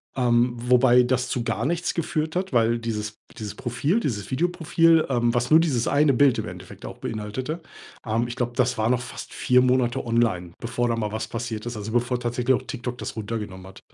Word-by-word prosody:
ähm, 120 -1 +3
wobei 125 +1 +5
das 125 0 0
zu 120 - -2
gar 115 0 -2
nichts 170 +3 -1
geführt 160 -1 -2
hat, 185 -3 -2
weil 115 0 +3
dieses 110 -2 -4 0.2
dieses 105 -2 -5
Profil 135 - 0
dieses 105 - -3
Videoprofil, 165 +1 +3
ähm, 120 -2 +1
was 120 0 0
nur 155 - +7
dieses 140 -8 +1
eine 145 0 +4
Bild 135 0 +4
im - - -3
Endeffekt - - -10
auch - - -8
beinhaltete, 115 +9 -4 0.4
ähm, 115 +2 0
ich 120 - -6
glaube, 120 -1 -1
das 125 -2 +1
war 110 +1 +1
noch 125 0 +2
fast 125 - -8
4 125 0 +3
Monate 125 -2 +1
online, 115 -7 +1
bevor 120 +1 -1
da 115 - +1
mal 105 -2 -2
was 110 0 -3
passiert 115 -1 -5
ist, 120 -1 -5
also, 105 +1 -5
bevor 120 +1 +1
tatsächlich 125 +1 +1
auch - - -3
TikTok 125 -2 -5
das - - -5
runtergenommen 105 -4 -5
hat. 95 - -13
120 Hz, 205 wpm, -24 LUFS, 115-130 Hz, 0.4 s, nur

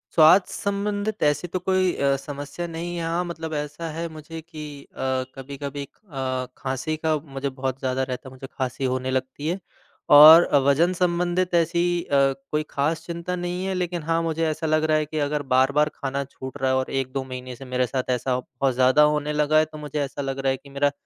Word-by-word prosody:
स्वास्थ्य 165 +4 +6
संबंधित 205 +1 -2
ऐसी 150 +4 +2
तो 185 +2 -3
कोई 185 -1 +1
अ, 140 0 +2
समस्या 145 +4 -6
नहीं 170 +1 -5
है। 170 - -3
हाँ, 170 +2 0
मतलब 160 -2 -5
ऐसा 150 +2 -4
है 165 +2 -4
मुझे 160 +1 -9
कि 150 -3 -9
अ, - - -25 0.4
कभी-कभी 140 +1 -6
एक 140 - -10 0.2
अ, 130 -1 -2
खाँसी 130 +4 -2
का 155 0 +1
मुझे 140 -2 -5
बहुत 130 0 -4
ज़्यादा 130 0 -1
रहता 130 +1 -5
है, - - -17
मुझे 130 +1 -9
खाँसी 130 0 -2
होने 130 0 -1
लगती 130 +3 -3
है। 175 +4 -1 0.5
और 155 +4 +10 0.2
वज़न-संबंधित 175 +4 +2
ऐसी 170 +1 +2 0.2
अ, 140 - +1 0.3
कोई 150 0 +1
खास 155 +3 -1
चिंता 170 +1 -4
नहीं 175 +1 -3
है, 190 - -1
लेकिन 175 -2 -2
हाँ, 165 +1 +1
मुझे 165 0 0
ऐसा 155 +1 -2
लग 155 0 +2
रहा 155 0 +3
है 155 - 0
कि 155 +1 -4
अगर 145 0 0
बार-बार 140 +3 +3
खाना 140 0 -3
छूट 130 0 -9
रहा 130 - +2
है, - - +2
और 130 - -1
1-2 135 0 -2
महीने 130 -1 -7
से 135 - -11
मेरे 125 -1 0
साथ 130 +1 -3
ऐसा 125 +1 -1
बहुत 130 +1 -2
ज़्यादा 130 +3 +4
होने 150 0 -2
लगा 150 +1 +2
है, 155 - +3
तो 155 0 -11
मुझे 150 0 -4
ऐसा 140 0 -4
लग 135 -1 -3
रहा 135 0 +1
है 135 - -1
कि 140 - -17
मेरा 140 +1 +1
150 Hz, 210 wpm, -24 LUFS, 135-165 Hz, 0.5 s, और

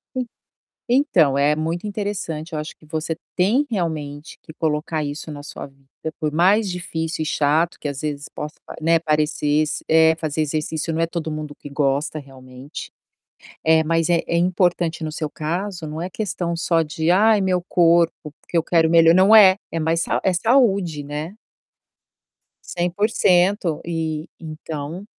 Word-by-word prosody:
E. 255 -1 -1 0.7
Então, 180 - +3
é 145 +2 +3
muito 165 +5 -3
interessante, 190 -6 -4
eu 155 - -2
acho 150 - -7
que - - -27
você 160 +1 -3 0.2
tem 215 +10 +3
realmente 155 -7 -4
que - - -12
colocar 155 0 -1
isso 145 +2 -6
na 145 -1 -8
sua 145 - -8
vida, 135 0 -26 0.3
por 155 -2 -1
mais 195 +6 +3
difícil 165 -2 -4
e - - -1
chato 155 +4 +1
que, - - -4
às 140 -2 -5
vezes, 145 -1 -4
possa 150 0 -7
pare - - -10
né, 165 +1 +4
parecesse, 150 -1 0
eh, 160 0 +5
fazer 155 -1 -2
exercício 155 +1 -2
não 160 - -2
é - - +3
todo 165 -2 -4
mundo 155 -1 -5
que 145 - -11
gosta 140 +2 0
realmente. 130 0 -10 0.7
É, 160 0 +5
mas 165 +1 +1
é 170 -1 +3
é 170 - 0
importante 175 -2 +1
no 155 - -3
seu 155 -2 -4
caso, 170 +3 -4
não 155 +1 -6
é 180 +2 -4
questão 180 -4 -3
só 165 -1 +1
de: 160 +1 -1
"Ai 210 +3 +4
meu 185 -2 +1
corpo, 170 -3 +2
porque 175 - -5
eu 165 - +2
quero 165 -1 +2
melhor." 165 0 +6
Não 190 +4 +6
é. 195 -3 +8 0.2
É 165 - -2
mais 165 +1 +1
sau - - -1
é 190 - +2
saúde, 195 - +2
né? 150 +6 -5 1.3
100% 180 -1 +1
e 160 -1 -3
então, 155 +2 -7
160 Hz, 165 wpm, -21 LUFS, 150-180 Hz, 1.3 s, é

